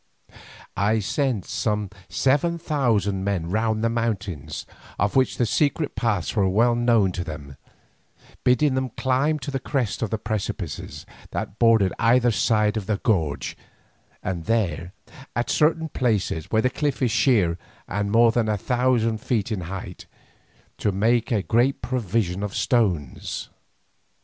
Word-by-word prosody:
I 105 +3 +2
sent 115 0 -1
some 105 -3 -1 0.2
seven 150 +6 +2
thousand 115 - 0
men 90 -4 -1
round 110 +1 0
the 115 - +3
mountains, 105 -10 -3 0.3
of 100 +2 0
which 130 -1 +2
the 120 - +2
secret 145 +6 0
paths 110 -6 -1
were 100 -3 +3
well 115 +5 +3
known 120 -5 +3
to 90 0 -3
them, 75 -4 -8 0.9
bidding 130 +3 +3
them 130 0 -1
climb 135 +4 +1
to 140 0 -6
the 135 - -2
crest 125 -6 -2
of 115 - -1
the 110 - -1
precipices 100 -6 -4 0.2
that 100 - -5
bordered 115 -5 +4
either 120 +1 +4
side 105 -1 +2
of 100 -3 -4
the 105 - +1
gorge, 80 -11 0 0.7
and 85 -3 -3
there, 90 -7 0 0.4
at 120 - 0
certain 160 +1 +2
places 105 - -1
where 110 0 +2
the 130 - +2
cliff 145 -3 -1
is 120 - +2
sheer 105 -8 +3 0.3
and 100 +1 -2
more 115 +1 +5
than 115 -1 +1
one 105 -1 +1
thousand 120 -1 +1
feet 110 -1 -1
in 105 -4 -2
height, 90 +1 -7 0.7
to 105 - +1
make 115 +5 +1
a 105 -4 +1
great 120 +6 +1
provision 110 -6 -1
of 105 -1 -4
stones. 90 - 0
110 Hz, 150 wpm, -24 LUFS, 100-125 Hz, 0.9 s, more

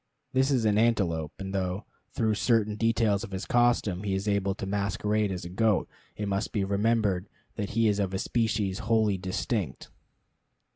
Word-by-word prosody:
This 130 +1 +3
is 125 -5 +2
an 105 -1 +3
antelope; 90 -10 +1
and 95 0 -6
though, 95 +1 -2 0.2
through 110 -2 0
certain 110 -1 +2
details 115 -2 +2
of 115 - -6
his 95 -1 -4
costume, 120 -6 +2
he 100 -2 -1
is 95 +2 -3
able 100 -1 +1
to 100 - -5
masquerade 105 +1 0
as 90 -2 -4
a - - -6
goat, 105 +2 +2 0.3
it 105 - -3
must 100 +2 -1
be 105 - 0
remembered 100 -1 +1 0.3
that 105 -3 -3
he 115 -1 +4
is 105 -1 +2
of 95 -2 0
a 95 - -1
species 105 -3 0
wholly 110 -3 +2
distinct. 95 - -3
105 Hz, 180 wpm, -28 LUFS, 95-110 Hz, 0.3 s, he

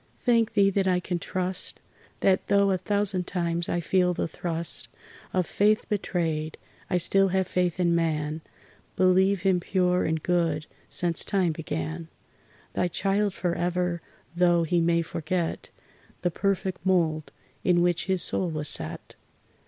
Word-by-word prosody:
Thank 230 -3 +3
Thee 200 -1 +5
that 195 0 +1
I 180 -1 +3
can 180 0 -3
trust! 185 +1 -3 0.4
That 190 -1 +2
though 200 -1 +4
a 185 - 0
thousand 195 -1 0
times 170 -1 -1
I 175 - 0
feel 180 +1 +1
the - - -1
thrust 165 0 -3 0.4
Of 185 -1 +1
faith 210 +4 +2
betrayed, 165 -6 -2 0.3
I 180 - +2
still 195 +3 +4
have 190 0 +1
faith 180 0 -1
in 170 -1 +3
man, 155 -2 -1 0.5
Believe 185 0 +3
him 190 -2 +3
pure 180 0 +1
and 160 -1 -1
good 165 -4 +1 0.2
since 170 -2 +1
time 190 -4 +1
began 160 +1 -4 0.7
Thy 180 - +1
child 195 +2 0
forever, 175 0 -1 0.3
though 175 -1 +3
he 170 +1 +1
may 170 0 +2
forget 165 +1 -3 0.5
The 175 - +1
perfect 190 -2 -1
mould 165 -5 +1 0.3
in 175 -1 +3
which 175 -1 +1
his 190 -2 +2
soul 180 - 0
was 150 -2 -3
set. 80 - -4
180 Hz, 145 wpm, -26 LUFS, 170-190 Hz, 0.7 s, Thee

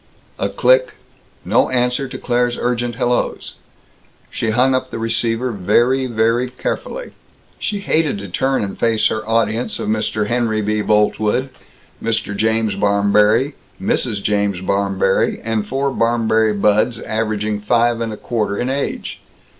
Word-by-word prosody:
A - - 0
click. - - +3 0.5
No - - +3
answer 125 +1 0
to 125 - -7
Claire's 120 0 0
urgent 120 -1 -1
hellos. 120 0 -1 0.8
She 115 - -2
hung 125 +4 +3
up 130 0 -1
the - - -5
receiver 115 +2 0
very, 120 +7 +2
very 115 +2 +1
carefully. - - -4 0.5
She 205 -1 -2
hated 160 - +1
to 100 0 -7
turn 130 +7 0
and 100 - -5
face 115 -2 +2
her 110 - -2
audience 115 +1 0
of - - -3
Mr. 110 -1 0
Henry 110 -1 0
B. 105 +1 0
Boltwood, 105 +4 +1 0.5
Mr. 115 -2 -1
James 110 0 +1
Barmberry, 105 +6 +3 0.3
Mrs. 130 - -1
James 100 -2 0
Barmberry, 95 0 +1
and 110 -2 -1
four 135 +3 -1
Barmberry 110 -2 +2
buds 105 +3 +2
averaging 110 -1 -2
five 120 +2 +2
and 115 -1 -2
a 105 - -6
quarter 105 -3 -2
in 125 +2 -1
age. 140 +1 -3
115 Hz, 140 wpm, -19 LUFS, 105-125 Hz, 0.8 s, click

